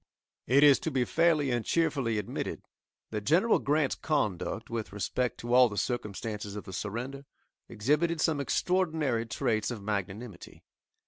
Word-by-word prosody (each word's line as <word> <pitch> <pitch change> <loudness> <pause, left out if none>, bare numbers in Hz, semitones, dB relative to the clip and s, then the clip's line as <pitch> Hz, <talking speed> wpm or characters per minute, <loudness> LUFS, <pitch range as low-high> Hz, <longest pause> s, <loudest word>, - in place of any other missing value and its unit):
It 140 +4 +5
is 145 -2 +7
to - - -2
be 130 -2 0
fairly 160 -4 +2
and 120 -2 0
cheerfully 140 -9 0
admitted 105 - -4 0.5
that 105 -1 -2
General 170 - +3
Grant's 145 -1 +1
conduct, 115 - -2
with 115 -2 -3
respect 105 +5 -2
to 120 +1 -3
all 125 -1 +7
the 105 - -7
circumstances 105 -2 -3
of 105 - -6
the 95 - -10
surrender 120 +8 -4 0.5
exhibited 150 +9 +1
some 155 -2 +1
extraordinary 155 -8 0
traits 110 -2 0
of 115 -5 -6
magnanimity. 100 0 -5
120 Hz, 145 wpm, -29 LUFS, 105-145 Hz, 0.5 s, is